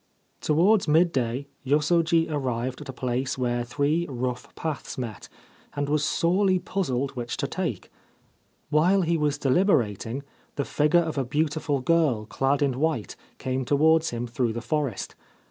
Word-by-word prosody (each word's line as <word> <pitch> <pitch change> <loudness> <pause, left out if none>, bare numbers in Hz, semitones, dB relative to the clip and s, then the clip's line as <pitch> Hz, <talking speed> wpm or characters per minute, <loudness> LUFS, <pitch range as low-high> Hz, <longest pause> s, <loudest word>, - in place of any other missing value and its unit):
Towards 180 +7 +3
midday 140 -6 +2 0.2
Yosoji 165 +4 +3
arrived 130 -3 -2
at 145 - -9
a - - -2
place 130 +1 -2
where 120 -1 0
three 145 +7 0
rough 125 -1 -4
paths 155 -4 -4
met, 115 -7 -6 0.5
and 145 0 -1
was 150 0 +1
sorely 185 +4 +2
puzzled 140 -8 -2
which 120 -2 -5
to - - -1
take. - - -4 0.8
While 180 +6 +4
he 170 0 +1
was 150 -2 0
deliberating 130 - +1 0.3
the 140 - -1
figure 150 +4 +3
of 160 -4 -2
a - - +1
beautiful 150 +1 -1
girl 140 -7 +2
clad 135 +5 +1
in 135 -2 0
white 155 -8 -1 0.2
came 130 0 -2
towards 160 +4 +3
him 120 0 -3
through 120 -1 -1
the 115 - -3
forest. 135 -2 -2
145 Hz, 145 wpm, -26 LUFS, 125-160 Hz, 0.8 s, While